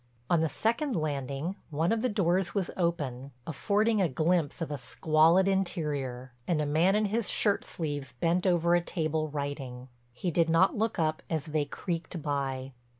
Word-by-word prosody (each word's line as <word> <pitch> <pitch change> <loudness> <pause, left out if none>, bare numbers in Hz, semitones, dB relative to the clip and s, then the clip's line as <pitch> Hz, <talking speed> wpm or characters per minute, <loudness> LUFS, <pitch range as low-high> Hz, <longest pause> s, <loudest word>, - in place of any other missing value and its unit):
On 170 -2 +4
the 160 - +1
second 235 - 0
landing 145 +3 -2
one 160 +4 0
of 225 -1 +1
the 255 - +1
doors 185 -3 +1
was 195 -4 0
open, 140 -7 -2
affording 210 +6 +1
a 180 - +2
glimpse 160 +2 +1
of 165 -3 -3
a 145 - -2
squalid 160 +8 +3
interior, 145 -10 -1
and 170 -4 +1
a 150 - +1
man 165 +7 +3
in 215 0 +2
his 215 +2 0
shirt 205 -2 +2
sleeves 145 -5 -4
bent 170 +8 +1
over 170 -1 +3
a 175 - +4
table 155 -2 -1
writing. 140 -3 -5 0.2
He 170 +9 -3
did 165 0 +2
not 165 +4 +4
look 220 +1 0
up 155 -1 0
as 160 -2 -1
they 155 -2 0
creaked 170 +3 -4
by. 135 -2 -2
165 Hz, 175 wpm, -29 LUFS, 145-185 Hz, 0.2 s, On